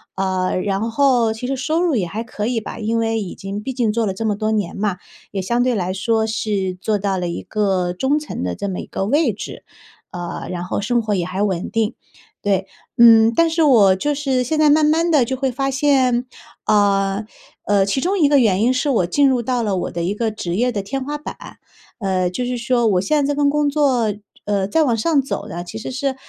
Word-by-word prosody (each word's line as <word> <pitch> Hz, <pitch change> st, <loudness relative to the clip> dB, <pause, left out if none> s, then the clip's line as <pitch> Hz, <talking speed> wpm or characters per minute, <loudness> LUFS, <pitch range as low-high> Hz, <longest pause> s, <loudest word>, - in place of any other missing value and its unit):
呃， 185 Hz, -1 st, -1 dB
然 205 Hz, +3 st, -1 dB
后 240 Hz, -3 st, +2 dB
其 220 Hz, +3 st, -7 dB
实 270 Hz, +2 st, -1 dB
收 315 Hz, +6 st, 0 dB
入 335 Hz, -5 st, +1 dB
也 190 Hz, -6 st, 0 dB
还 215 Hz, +7 st, -4 dB
可 215 Hz, -2 st, -4 dB
以 240 Hz, -1 st, 0 dB
吧， 215 Hz, -, -8 dB
因 225 Hz, +1 st, -1 dB
为 225 Hz, -1 st, 0 dB
已 190 Hz, -, -6 dB
经 195 Hz, +2 st, -6 dB
毕 265 Hz, +5 st, -4 dB
竟 240 Hz, -4 st, +1 dB
做 230 Hz, 0 st, 0 dB
了 195 Hz, -, -1 dB
这 225 Hz, -, -4 dB
么 210 Hz, -2 st, +1 dB
多 215 Hz, +1 st, -1 dB
年 210 Hz, -5 st, -1 dB
嘛， 200 Hz, -3 st, -1 dB, 0.3 s
也 200 Hz, -, -3 dB
相 235 Hz, +6 st, 0 dB
对 250 Hz, -1 st, +2 dB
来 185 Hz, -3 st, -1 dB
说 220 Hz, +3 st, 0 dB
是 205 Hz, -4 st, -2 dB
做 215 Hz, 0 st, 0 dB
到 195 Hz, -1 st, -1 dB
了 175 Hz, -, -2 dB
一 170 Hz, -, -5 dB
个 190 Hz, -4 st, 0 dB
中 265 Hz, +10 st, +1 dB
层 300 Hz, -, -5 dB
的 90 Hz, 0 st, -2 dB
这 200 Hz, -, -4 dB
么 185 Hz, -, -4 dB
一 -, -, -7 dB
个 195 Hz, -, -3 dB
位 285 Hz, +4 st, +2 dB
置， 205 Hz, -, -8 dB, 0.5 s
呃， 175 Hz, -1 st, -6 dB
然 175 Hz, -1 st, -4 dB
后 180 Hz, -, -3 dB
生 240 Hz, +4 st, +1 dB
活 215 Hz, -2 st, -2 dB
也 180 Hz, -3 st, -1 dB
还 185 Hz, +3 st, -2 dB
稳 190 Hz, -4 st, -1 dB
定， 225 Hz, -1 st, -1 dB, 0.5 s
对。 195 Hz, -2 st, 0 dB, 0.3 s
嗯， 230 Hz, -1 st, +7 dB
但 335 Hz, +4 st, +4 dB
是 325 Hz, 0 st, +1 dB
我 215 Hz, -10 st, +5 dB
就 290 Hz, +9 st, -1 dB
是 270 Hz, -3 st, 0 dB
现 310 Hz, +5 st, -1 dB
在 305 Hz, -1 st, +4 dB
慢 305 Hz, +1 st, +5 dB
慢 330 Hz, +3 st, +2 dB
地 285 Hz, -6 st, +4 dB
就 260 Hz, -, -2 dB
会 265 Hz, 0 st, -1 dB
发 270 Hz, +2 st, -1 dB
现， 265 Hz, -3 st, +2 dB, 0.4 s
呃 200 Hz, 0 st, +2 dB, 0.4 s
呃， 200 Hz, -1 st, +3 dB
其 200 Hz, +7 st, 0 dB
中 375 Hz, +8 st, 0 dB
一 300 Hz, -6 st, +4 dB
个 285 Hz, -1 st, +5 dB
原 205 Hz, -6 st, +2 dB
因 245 Hz, +3 st, +3 dB
是 260 Hz, +3 st, 0 dB
我 225 Hz, -10 st, +2 dB
进 275 Hz, +11 st, +3 dB
入 255 Hz, -2 st, +2 dB
到 245 Hz, +1 st, -1 dB
了 205 Hz, -3 st, 0 dB
我 180 Hz, -, -3 dB
的 170 Hz, -, -4 dB
一 180 Hz, +4 st, -1 dB
个 225 Hz, 0 st, -1 dB
职 175 Hz, -5 st, -4 dB
业 245 Hz, +5 st, +1 dB
的 205 Hz, -4 st, -2 dB
天 260 Hz, +8 st, -4 dB
花 295 Hz, +2 st, -4 dB
板， 295 Hz, -, -10 dB, 0.4 s
呃， 185 Hz, -3 st, 0 dB
就 245 Hz, +8 st, -3 dB
是 250 Hz, 0 st, -2 dB
说 240 Hz, 0 st, +1 dB
我 185 Hz, -4 st, +2 dB
现 290 Hz, +8 st, +1 dB
在 -, -, -1 dB
这 -, -, -4 dB
份 285 Hz, 0 st, +2 dB
工 295 Hz, 0 st, +1 dB
作， 260 Hz, -7 st, +1 dB, 0.3 s
呃， 200 Hz, -2 st, 0 dB
再 315 Hz, +11 st, +2 dB
往 245 Hz, -6 st, +2 dB
上 280 Hz, +6 st, +2 dB
走 240 Hz, -6 st, -5 dB
呢， 175 Hz, -2 st, -6 dB
其 215 Hz, +5 st, -7 dB
实 225 Hz, -, -6 dB
是 265 Hz, +1 st, -2 dB
225 Hz, 260 characters per minute, -20 LUFS, 195-265 Hz, 0.5 s, 嗯